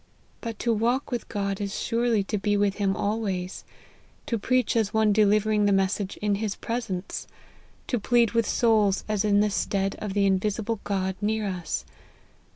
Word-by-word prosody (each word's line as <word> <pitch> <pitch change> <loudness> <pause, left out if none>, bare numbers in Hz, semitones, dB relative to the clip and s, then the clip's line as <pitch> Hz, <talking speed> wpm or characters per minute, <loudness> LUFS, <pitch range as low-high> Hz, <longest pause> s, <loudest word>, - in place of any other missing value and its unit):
But 230 -3 -5
to 235 +1 +1
walk 240 +6 0
with 240 -2 -3
God 200 -1 -2
is 200 0 -3
surely 230 -3 +1
to 205 +1 -2
be 205 +1 +1
with 200 -1 +1
him 195 -2 +1
always; 200 -4 -2 0.6
to 230 - -1
preach 255 +2 +1
as 220 -2 +1
one 215 -1 +4
delivering 210 0 +3
the 205 - +3
message 195 0 0
in 210 -1 +2
his 210 -2 -1
presence; 225 -6 -4 0.6
to 245 - -1
plead 235 0 +3
with 230 -2 +1
souls 215 -4 +3
as 215 -1 0
in 205 -1 +4
the 210 0 +1
stead 195 0 -1
of 210 -2 -4
the 200 -1 +3
invisible 205 +3 0
God 190 -2 -1
near 215 +1 0
us. 180 -3 -3
210 Hz, 170 wpm, -26 LUFS, 195-225 Hz, 0.6 s, one